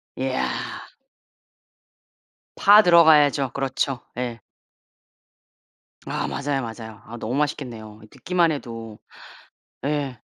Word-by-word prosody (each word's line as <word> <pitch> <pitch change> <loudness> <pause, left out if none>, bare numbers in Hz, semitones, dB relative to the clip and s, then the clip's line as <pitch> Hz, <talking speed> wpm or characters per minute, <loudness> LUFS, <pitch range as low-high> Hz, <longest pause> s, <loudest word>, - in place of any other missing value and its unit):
이야. - - -1 2.1
파 205 +2 +7
들어가야죠. 150 - +5
그렇죠. 135 -1 -2 0.2
예. 120 -2 -4 1.7
아 - - -3
맞아요, 140 -1 -2
맞아요. 110 -2 -8
아 120 - -9
너무 120 +2 -4
맛있겠네요 120 -7 -4
이 - - -14
듣기만 175 +7 0
해도. 115 -6 -7 0.9
예. 140 -4 -2
135 Hz, 195 characters per minute, -23 LUFS, 115-150 Hz, 2.1 s, 파